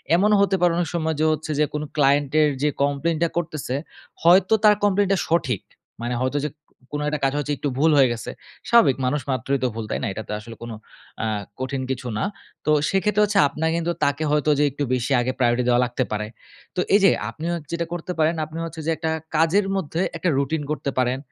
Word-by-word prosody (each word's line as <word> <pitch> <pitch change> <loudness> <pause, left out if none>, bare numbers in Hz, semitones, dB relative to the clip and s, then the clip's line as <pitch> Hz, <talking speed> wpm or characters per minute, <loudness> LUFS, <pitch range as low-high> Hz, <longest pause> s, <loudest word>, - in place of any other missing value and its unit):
এমনও 210 +4 +4
হতে 200 -1 +3
পারে 175 -1 +4
অনেক 175 -3 0
সময় 160 -1 0
যে 155 - +3
হচ্ছে 155 0 -3
যে 150 - +4
কোনো 150 0 -2
client 140 -1 +3
এর 150 - +4
যে 150 - +4
কমপ্লেইনটা 155 +4 0
করতেছে, 155 -6 -3 0.5
হয়তো 185 +4 +5
তার 210 -1 +7
কমপ্লেইনটা 200 -1 +3
সঠিক। 135 - 0 0.4
মানে 120 +1 -2
হয়তো 130 +3 0
যে, - - -1 0.4
কোনো 150 0 -2
একটা 150 0 -2
কাজ 135 - +1
হচ্ছে 145 0 -2
একটু 145 - -2
ভুল 160 +3 +4
হয়ে 135 -3 +6
গেছে, 115 - -6 0.4
স্বাভাবিক 230 - +5
মানুষ 145 +3 0
মাত্রই 130 +2 0
তো - - +3
ভুল। 115 -1 -4
তাই - - -2
না? - - 0
এটা 110 - -6
তো - - -7
আসলে 115 +2 -10
কোনো 115 -1 -6 0.4
অ্যা 110 - -1 0.3
কঠিন 130 +1 -3
কিছু 125 -1 -4
না। - - -1 0.4
তো 155 - +3 0.2
সেক্ষেত্রে 205 +2 +2
হচ্ছে 205 -1 +1
আপনার 155 +3 -2
কিন্তু 170 0 0
তাকে 140 +2 +1
হয়তো 150 0 +2
যে - - +4
একটু 145 +2 -3
বেশি 125 +1 -1
আগে 125 +1 0
priority 120 0 +2
দেওয়া 120 0 +4
লাগতে 125 +1 -1
পারে। 105 0 -2 0.5
তো - - -2 0.2
এইযে 200 -2 +6 0.2
আপনি 150 +8 -8
হচ্ছে 160 -4 -6
যেটা 170 0 -1
করতে 175 +1 -4
পারেন, 160 +2 +3
আপনি 155 +1 -9
হচ্ছে 165 0 -8
যে - - -1
একটা 160 0 -2 0.2
কাজের 165 +6 +3
মধ্যে 170 -2 -2 0.2
একটা 175 +2 0
রুটিন 140 +3 0
করতে 150 -2 -2
পারেন। 125 0 +1
150 Hz, 215 wpm, -23 LUFS, 130-170 Hz, 0.5 s, তার